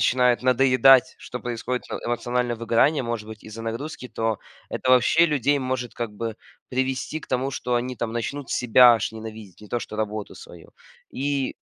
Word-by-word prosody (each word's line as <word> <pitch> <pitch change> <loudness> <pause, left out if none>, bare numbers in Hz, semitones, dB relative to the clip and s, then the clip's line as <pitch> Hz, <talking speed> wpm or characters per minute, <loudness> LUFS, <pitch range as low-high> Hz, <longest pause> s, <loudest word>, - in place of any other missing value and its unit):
начинает 125 -1 +3
надоедать, 130 0 +5
что 125 - -7
происходит 125 +1 -3
э - - -2
эмоциональное 120 0 -1
выгорание, 115 +5 +2
может 115 -2 -4
быть 110 -1 -10
из-за 110 +1 -9
нагрузки. 125 +4 -5
То 115 -2 -2 0.3
это, 130 - -2
вообще, 130 +6 +5
людей 145 -2 +1
может, 130 -2 -3
как 115 -3 -4
бы 110 +1 -5 0.3
привести 130 +4 -2
к - - -14
тому, 130 +2 -1
что 125 -2 -2
они 125 +1 -2
там 115 0 -3
начнут 135 +4 -4
себя 125 0 +6
аж 110 -2 -1
ненавидеть, 110 -3 -10
не 105 - -13
то 120 - -2
что 110 - -7
работу 105 -1 -3
свою. - - -13 0.4
И 140 0 -2
120 Hz, 175 wpm, -24 LUFS, 115-130 Hz, 0.4 s, себя